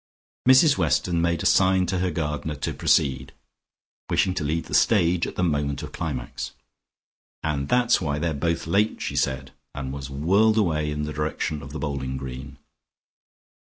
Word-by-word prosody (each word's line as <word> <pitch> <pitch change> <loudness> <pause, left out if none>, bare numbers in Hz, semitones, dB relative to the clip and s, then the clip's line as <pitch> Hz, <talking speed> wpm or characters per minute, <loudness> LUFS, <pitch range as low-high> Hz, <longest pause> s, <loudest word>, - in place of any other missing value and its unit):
Mrs 140 +3 +6
Weston 85 -2 +1
made 85 -1 0
a - - -4
sign 95 -1 +4
to 90 +1 -1
her 90 0 0
gardener 75 -2 -3
to - - -3
proceed, 65 -1 +1 0.8
wishing 95 - +2
to 90 - -3
leave 80 +3 -1
the - - -9
stage 90 -5 +3
at - - -7
the 90 - -1
moment 75 -4 -1
of - - -7
climax. 70 -7 -5 0.9
"And 70 -3 -2
that's 125 -3 +3
why 75 -4 -1
they're 80 +1 -1
both 85 +3 -1
late," 100 +6 +1
she - - -4
said, 65 0 -1 0.2
and 65 -2 -5
was 70 -1 -6
whirled 100 +11 +2
away 80 -7 +1
in 75 0 -3
the 75 0 -4
direction 75 0 -2
of 70 0 -10
the 80 - -5
bowling 70 -3 -3
green. 65 +1 -8
75 Hz, 170 wpm, -24 LUFS, 70-90 Hz, 0.9 s, Mrs